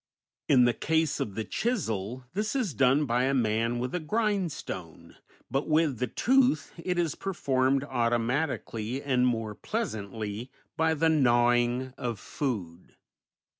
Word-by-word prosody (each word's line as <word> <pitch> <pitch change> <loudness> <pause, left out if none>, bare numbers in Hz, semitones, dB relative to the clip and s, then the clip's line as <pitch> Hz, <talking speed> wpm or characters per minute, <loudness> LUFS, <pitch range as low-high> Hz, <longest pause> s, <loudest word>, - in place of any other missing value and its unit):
In 125 -4 +6
the 120 - +3
case 160 +4 0
of 100 - -3
the 110 - -2
chisel 125 - -2
this 210 +5 -1
is 235 - 0
done 135 +3 +3
by 125 0 +1
a 135 +1 +1
man 115 0 +1
with 125 +1 -3
a 180 - 0
grindstone, 175 - -3 0.4
but 135 +2 0
with 155 -5 +2
the 125 - 0
tooth 255 - +2
it 180 +1 -3
is 170 -4 +1
performed 135 -7 0
automatically 120 -1 -1
and 125 -2 +2
more 115 -3 -1
pleasantly 110 - -4 0.3
by 160 0 +2
the 160 +2 +2
gnawing 120 -2 +3
of 120 -4 -3
food. 95 - -4
130 Hz, 135 wpm, -28 LUFS, 115-160 Hz, 0.4 s, In